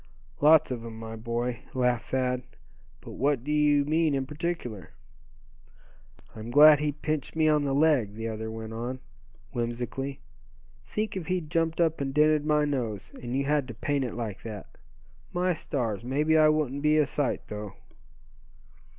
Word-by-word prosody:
"Lots 155 -1 +5
of 120 -2 -4
'em, 115 -1 -8
my 110 0 -7
boy," 115 +1 -3 0.2
laughed 125 -2 +1
Thad. 125 -1 0 0.6
"But - - -10
what 140 -2 0
do 150 - -3
you 150 -1 +3
mean 155 0 +2
in 135 -1 -1
particular?" 145 - -5 1.4
"I'm 110 +1 -7
glad 150 +3 +8
he 150 0 0
pinched 150 0 -3
me 160 -1 +3
on 150 -1 +3
the 135 -1 0
leg," 140 -9 +3
the 115 +1 -4
other 110 0 -4
went 110 0 -7
on, 120 +3 -4 0.5
whimsically. 120 +3 -3 0.7
"Think 215 -1 -3
if 180 -4 -4
he'd 175 -4 -2
jumped 165 -1 0
up 165 -3 +2
and 135 0 -3
dented 150 0 +3
my 150 -1 +3
nose, 120 -8 -3
and 120 +1 -4
you 140 - +1
had 145 -2 +1
to 120 - -8
paint 140 +4 -1
it 125 - -4
like 110 -4 -5
that! 110 -3 -9 0.6
My 180 +1 +1
stars! 115 -9 -3
mebbe 145 +5 0
I 155 -1 +6
wouldn't 145 -3 0
be 150 +1 +3
a 150 - +4
sight 140 0 -1
though." 105 -1 -7
140 Hz, 165 wpm, -28 LUFS, 120-150 Hz, 1.4 s, glad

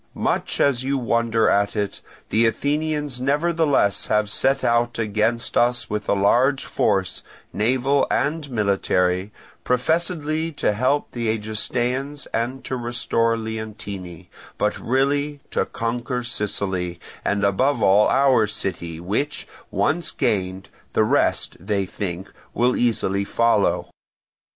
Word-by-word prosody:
Much - - -1
as 130 -3 +2
you 135 +1 0
wonder 115 -2 +1
at 100 +1 +2
it, 100 -2 -2 0.3
the 115 +2 +3
Athenians 145 0 -1
nevertheless 145 -6 +2
have 105 -1 +1
set 135 +4 +1
out 120 0 +2
against 110 +2 0
us 120 -1 +1
with 105 0 -3
a - - +4
large 125 +8 +3
force, 95 -3 0 0.3
naval 130 +6 +2
and 150 0 0
military, 95 -3 +1 0.3
professedly 160 +3 0
to 140 -8 0
help 130 +7 0
the 120 -2 -3
Egestaeans 120 +6 -2
and 120 +4 -2
to 130 - -3
restore 120 -1 0
Leontini, 105 -6 -6 0.3
but - - +1
really 140 +3 0
to - - +1
conquer 120 +1 -3
Sicily, 95 -6 -2 0.2
and 100 0 0
above 115 +5 +2
all 100 +2 +5
our 135 -5 +4
city, 85 -5 -4
which 110 - -2 0.2
once 165 +4 0
gained, 95 -7 -1 0.2
the - - +3
rest, - - +1
they 100 +1 -1
think, 95 -1 -5 0.3
will 125 +2 +3
easily 100 -5 +1
follow. 115 0 +1
115 Hz, 120 wpm, -22 LUFS, 100-135 Hz, 0.3 s, all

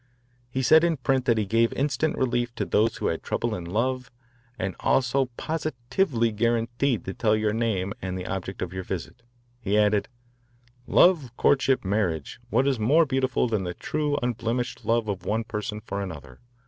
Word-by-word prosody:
He 130 +1 -2
said 160 +5 +6
in 170 -2 +2
print 130 0 0
that 115 -3 +3
he 110 - +1
gave 115 +3 +2
instant 145 +2 0
relief 120 -2 0
to - - -2
those 110 +2 +2
who - - -4
had 80 - 0
trouble - - -2
in 90 - -5
love, 125 +7 -1 0.5
and 95 0 -3
also 135 +1 +2
positively 135 -4 -1
guaranteed 120 +3 0
to 95 - -4
tell 110 +2 +2
your 110 -1 0
name 105 -4 -1
and 95 0 -3
the 90 - -5
object 95 0 -4
of 90 -1 -6
your 95 - -3
visit. 95 +6 -6 0.4
He 105 -3 0
added: 105 -1 +3 0.8
Love, 165 -8 +4
courtship, 135 -4 +3
marriage. 95 -6 -1
What 130 +4 +2
is 135 -4 +1
more 145 +10 +4
beautiful 130 -2 +1
than 110 -4 -1
the 90 -1 -4
true 150 -1 -1
unblemished 120 +1 -2
love 115 -1 +1
of 95 -3 -3
one 110 +4 0
person 105 -1 -4
for 100 -1 -5
another? 75 -9 -8
115 Hz, 175 wpm, -26 LUFS, 100-130 Hz, 0.8 s, said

